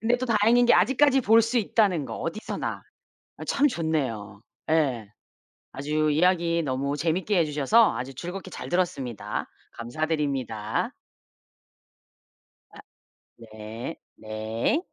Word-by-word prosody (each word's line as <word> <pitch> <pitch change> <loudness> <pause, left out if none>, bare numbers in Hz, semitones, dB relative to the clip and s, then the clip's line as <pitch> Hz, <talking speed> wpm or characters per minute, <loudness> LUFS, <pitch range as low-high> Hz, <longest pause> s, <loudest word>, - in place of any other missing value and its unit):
근데 235 +2 +2
또 255 - -3
다행인 230 +2 +4
게 240 - +6
아직까지 265 +7 +4
볼 225 +2 +6
수 230 +3 -1
있다는 195 -7 +1
거, - - -6
어디서나. 165 +7 -4 0.6
어 - - -5
참 285 - +3
좋네요. 130 - -2 0.3
예 130 -10 +1 0.6
아주 150 +3 0
이야기 170 +1 +2
너무 140 +1 -1
재밌게 175 +6 0
해 170 - +4
주셔서 150 +10 +3
아주 130 +2 -5
즐겁게 180 +6 -7
잘 - - -7
들었습니다. 140 - -2 0.2
감사드립니다. 130 -4 -2 1.8
아, - - -14 0.6
네. 110 +1 -8 0.2
네. 110 - -2
155 Hz, 245 characters per minute, -26 LUFS, 125-205 Hz, 1.8 s, 게